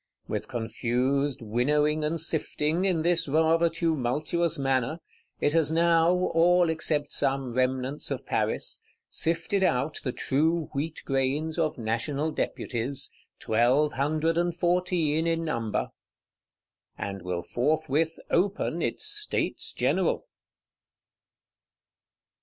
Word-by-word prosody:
With - - -3
confused 125 +4 -1
winnowing 150 +7 +1
and 160 +2 -1
sifting, 160 +1 0
in 175 -5 +1
this 170 -1 +2
rather 160 +3 +3
tumultuous 160 +1 0
manner, 135 +3 0 0.4
it 145 - +1
has 160 -2 +3
now 165 0 +4 0.2
(all 175 0 +4
except 150 -2 -1
some 135 -3 -1
remnants 130 +2 -1
of - - -4
Paris) - - -1 0.3
sifted 170 +4 0
out 140 -2 +1
the 125 - -1
true 160 +6 0
wheat 155 +3 -3
grains 140 +5 0
of 155 -2 0
National 130 +7 -1
Deputies, 135 0 -2 0.3
Twelve 125 +7 +2
Hundred 155 +4 +1
and 175 -1 0
Fourteen 175 -3 +1
in 165 0 0
number; 115 -8 -1 1.1
and 100 -1 -5
will 90 -1 -3
forthwith 155 - 0
open 195 +4 +1
its - - -1
States 420 0 0
General. - - 0
150 Hz, 110 wpm, -27 LUFS, 130-165 Hz, 1.1 s, now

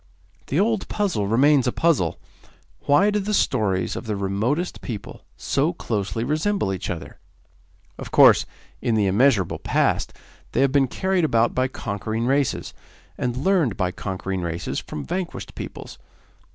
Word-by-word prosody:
The 145 - 0
old 220 +1 +1
puzzle 185 - -1
remains 135 +4 +4
a - - +2
puzzle 135 - +1 0.7
why 190 +9 +5
do 210 - +1
the 210 +1 -1
stories 95 - +1
of - - -6
the 105 - -1
remotest 105 - -1
people 110 -6 -7
so 150 +6 0
closely 110 - -3
resemble 155 - 0
each 95 - -4
other? 85 -2 -6 0.8
Of - - -7
course, - - +6 0.3
in 115 - +1
the 105 -2 +2
immeasurable 100 -1 +2
past, - - +1 0.4
they - - +2
have 135 -1 +3
been 140 -1 +3
carried 190 +6 0
about 115 -6 +2
by 130 0 +1
conquering 110 -1 -3
races, 135 +1 0 0.4
and 125 0 -2
learned 150 - +1
by 90 -1 0
conquering 95 -1 -4
races 85 0 -3
from 75 - -7
vanquished 180 -1 -4
peoples. - - -8
125 Hz, 150 wpm, -23 LUFS, 100-155 Hz, 0.8 s, course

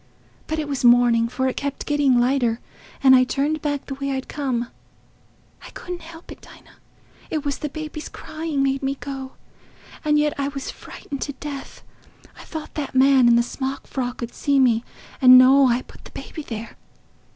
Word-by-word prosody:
But 315 - -2
it 305 -2 -2
was 275 -3 -3
morning, 240 -1 +5
for 260 +2 -1
it 260 - -2
kept 280 -1 -4
getting 285 -4 +3
lighter, 245 -2 +1 0.4
and 260 -1 +8
I 255 - +6
turned 285 +4 -1
back 290 -2 -2
the 275 - -5
way 275 0 -3
I'd 265 0 -4
come. 255 -5 -2 1.0
I - - -10
couldn't 355 -1 -6
help 330 +1 -12
it, - - -11
Dinah; - - -17 0.5
it 305 -2 -3
was 285 -1 -2
the 300 - -3
baby's 305 0 -7
crying 310 -3 -3
made 270 0 0
me 270 0 -1
go—and 275 +2 -6
yet 300 0 +2
I 280 - 0
was 275 -1 -5
frightened 280 -1 -9
to 285 - -3
death. 275 0 -8 0.5
I - - -12
thought 315 -2 -8
that 285 -3 -5
man 265 -1 +5
in 235 - +6
the 235 - +4
smock 265 +2 -5
frock 250 -2 -4
'ud 235 - -6
see 280 -1 +1
me 235 -3 +3 0.4
and 255 -1 +9
know 265 +2 +7
I 245 +1 +1
put - - -17
the - - -12
baby 315 - -8
there. 230 -5 -7
275 Hz, 185 wpm, -22 LUFS, 255-290 Hz, 1.0 s, and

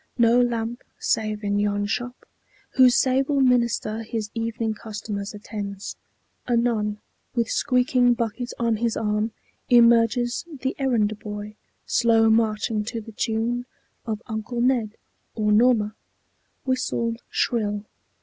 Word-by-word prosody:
No 235 +1 +5
lamp 235 0 -1 0.2
Save 215 -1 -1
in 205 0 0
yon 205 0 0
shop, 245 +4 -4 0.5
whose 255 -1 +6
sable 270 +2 +2
minister 235 -4 +2
His 220 -2 -4
evening 225 -1 -2
customers 210 -1 -6
attends. 205 -1 -6 0.5
Anon, 230 -3 +1 0.4
With 230 -2 0
squeaking 250 -2 +3
bucket 240 +1 -3
on 230 -2 +1
his 230 0 -1
arm, 210 +1 0 0.4
emerges 235 0 +4 0.2
The 265 +1 -1
errand 220 -6 +1
boy, 210 0 -7 0.3
slow 225 -1 +4
marching 220 -1 +1
to 230 +1 -4
the 225 +1 -10
tune 235 +3 -1 0.4
Of 215 0 -3
"Uncle 225 +1 -4
Ned" 240 -3 +1 0.4
or 210 -2 +1
"Norma," 215 -1 +4 0.7
whistled 235 -3 -1
shrill. 210 -3 0
225 Hz, 120 wpm, -24 LUFS, 215-245 Hz, 0.7 s, whose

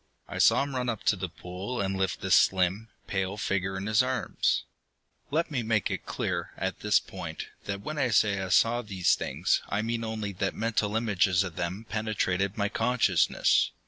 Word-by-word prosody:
I - - -6
saw - - +5
him 140 -1 -5
run 125 -1 -1
up 110 -3 -3
to - - +3
the 90 -2 -4
pool 90 +8 -6
and 95 -1 -1
lift 95 -2 -1
the - - -3
slim, 95 +4 +3 0.2
pale 95 0 -2
figure 95 -1 -1
in 95 - -4
his 110 +1 +4
arms. 130 0 0 0.7
Let 160 +3 0
me 130 -4 0
make 110 -2 0
it - - -4
clear, - - -3
at - - -3
this - - +3
point, - - -7 0.2
that 100 0 -4
when 150 +7 -4
I 130 -3 +2
say 105 -3 +3
that 95 - -2
I - - -6
saw 120 +5 +4
these 95 -6 +1
things, - - 0
I 105 +2 0
mean 115 0 -2
only 110 -2 -3
that 95 +1 -2
mental 110 -2 0
images 100 -5 +2
of 90 -4 -6
them 90 +6 -3
penetrated 100 -3 -1
my 100 -1 +1
consciousness. 115 +3 +2
105 Hz, 195 wpm, -28 LUFS, 95-115 Hz, 0.7 s, saw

